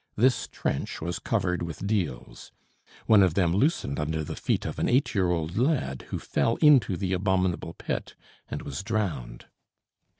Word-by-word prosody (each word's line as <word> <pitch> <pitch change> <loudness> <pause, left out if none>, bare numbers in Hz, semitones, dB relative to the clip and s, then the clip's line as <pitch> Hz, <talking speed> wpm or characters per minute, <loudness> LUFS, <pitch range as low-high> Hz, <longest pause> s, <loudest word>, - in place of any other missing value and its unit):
This 125 +3 +2
trench 70 - -3
was 85 +2 -3
covered 90 -1 -1
with 85 +2 -5
deals. 95 - -3 0.5
One 110 -2 +6
of 90 -4 +3
them 85 -4 +2
loosened 100 - +1
under 80 +1 -1
the - - -5
feet - - -1
of - - -4
an - - +1
eight 125 -1 +2
year 95 -5 +2
old 85 +3 -1
lad, 125 - 0
who - - -2
fell 115 - 0
into 130 - +5
the 95 -1 -1
abominable 95 -3 0
pit - - -4 0.3
and - - -5
was 70 - -5
drowned. 95 - -3
95 Hz, 165 wpm, -27 LUFS, 80-110 Hz, 0.5 s, One